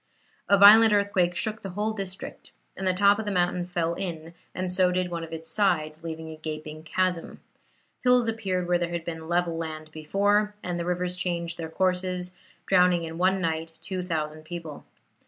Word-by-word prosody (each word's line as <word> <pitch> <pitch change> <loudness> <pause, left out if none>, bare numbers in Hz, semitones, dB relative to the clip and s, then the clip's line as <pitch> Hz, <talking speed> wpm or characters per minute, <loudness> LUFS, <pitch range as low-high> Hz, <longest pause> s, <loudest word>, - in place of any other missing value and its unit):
A 200 - +6
violent 210 +2 +9
earthquake 195 -4 +2
shook 215 +5 -2
the 195 - -6
whole 210 +4 -2
district, 195 -3 -6 0.2
and 190 - -3
the 185 - +3
top 200 +2 +5
of 220 - -3
the 205 - -2
mountain 175 -1 0
fell 170 -2 -1
in, 170 -3 -5 0.2
and 185 0 -2
so 180 0 +3
did 180 0 -1
one 170 -1 -3
of 165 - -8
its 160 0 -6
sides, 160 -7 +1
leaving 160 -1 -6
a 155 - -9
gaping 155 0 -6
chasm. 180 +1 -1 0.6
Hills 250 -2 +4
appeared 190 -6 -1
where 175 0 +2
there 175 -1 -1
had 170 -1 -4
been 160 -1 -6
level 175 -1 +1
land 155 -1 -5
before, 205 +7 +1
and 175 -1 -3
the 170 - -2
rivers 180 0 0
changed 170 -2 -3
their 160 -1 -4
courses, 180 0 -1 0.3
drowning 180 -2 +4
in 165 +1 -6
one 190 +1 +2
night 165 -1 -2
2,000 160 -5 -3
people. 165 -2 -8
180 Hz, 185 wpm, -26 LUFS, 165-190 Hz, 0.6 s, violent